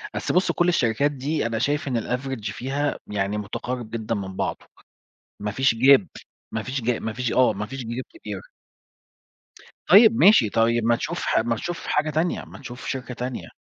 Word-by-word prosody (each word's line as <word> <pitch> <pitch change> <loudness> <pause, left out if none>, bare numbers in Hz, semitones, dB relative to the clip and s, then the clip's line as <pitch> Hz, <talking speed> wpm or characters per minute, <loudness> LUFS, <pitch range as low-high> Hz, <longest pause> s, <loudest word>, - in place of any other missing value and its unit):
أصل - - -2
بُص 185 - +3
كل 175 - +1
الشركات 140 -2 +2
دي، 145 0 -2
أنا 115 -1 -1
شايف 145 +4 0
إن 120 -4 0
الaverage 125 -4 -3
فيها 140 +5 -2
م - - -11
يعني 100 0 -1
مُتقارب 120 +3 -5
جدًا 115 0 -3
من 95 -2 -5
بعضه. - - -3 0.7
مفيش 115 +4 +1
gap، 130 -2 +6 0.5
مفيش 125 +5 -3
جا 120 0 0
مفيش 115 +2 -3
آه، 130 -3 +4
مفيش 105 +7 -5
gap 125 - -6
كبير. - - -8 1.4
طيّب 220 +2 +8
ماشي، 195 - +6
طيب 115 +1 +2
ما 120 +1 +3
تشوف - - -4
ح - - +2
ما 115 +1 0
تشوف 175 +9 -5
حاجة 155 +1 +1
تانية، 160 +4 -1
ما - - -12
تشوف 125 -2 -9
شركة 130 -1 -4
تانية. 125 +1 -5
125 Hz, 170 wpm, -24 LUFS, 110-140 Hz, 1.4 s, طيّب